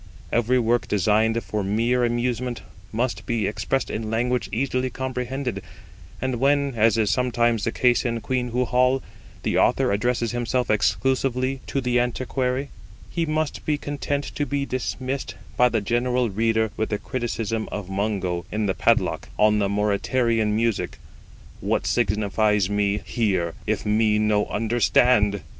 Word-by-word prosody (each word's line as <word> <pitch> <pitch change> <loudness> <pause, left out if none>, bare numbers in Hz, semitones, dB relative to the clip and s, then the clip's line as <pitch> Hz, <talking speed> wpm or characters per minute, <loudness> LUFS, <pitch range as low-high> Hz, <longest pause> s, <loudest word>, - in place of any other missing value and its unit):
Every 120 +2 +2
work 120 0 +1
designed 110 +3 +2
for 105 -1 -2
mere 115 +5 +1
amusement 120 -1 -1 0.3
must 120 +3 -1
be 115 -4 0
expressed 125 +5 -1
in 110 0 -3
language 120 +2 0
easily 130 +1 0
comprehended; 130 -3 -3 0.6
and 130 -2 -1
when, 140 +1 +2
as 115 0 +3
is 105 -3 +2
sometimes 120 -2 +1
the 115 - 0
case 125 0 +2
in 115 -2 -1
QUEENHOO 125 +1 -1
HALL, 125 +2 +2 0.4
the - - +1
author - - +3
addresses 120 +3 0
himself 120 0 0
exclusively 130 +3 +1
to 135 - -1
the 125 -1 +1
antiquary, 130 +2 -1 0.4
he 165 -2 -1
must 155 0 -1
be 150 -1 0
content 145 0 -3
to 145 - -2
be 140 -1 -1
dismissed 130 +1 -3 0.2
by 125 0 +5
the 115 -2 0
general 120 +2 0
reader 110 +1 +1
with 110 - -1
the 105 - 0
criticism 115 -2 -3
of 105 -3 -5
Mungo, 95 -3 -2
in 105 0 -1
the 95 - +1
PADLOCK, - - +1
on 105 0 +4
the 100 -1 +1
Mauritanian 105 +2 +1
music, 115 -1 -1 0.6
'What - - -1
signifies 105 -2 +1
me 105 0 +1
hear, 95 -8 0
if - - -1
me 105 0 +3
no 105 -1 +2
understand?' 110 -2 +2
115 Hz, 145 wpm, -24 LUFS, 105-125 Hz, 0.6 s, by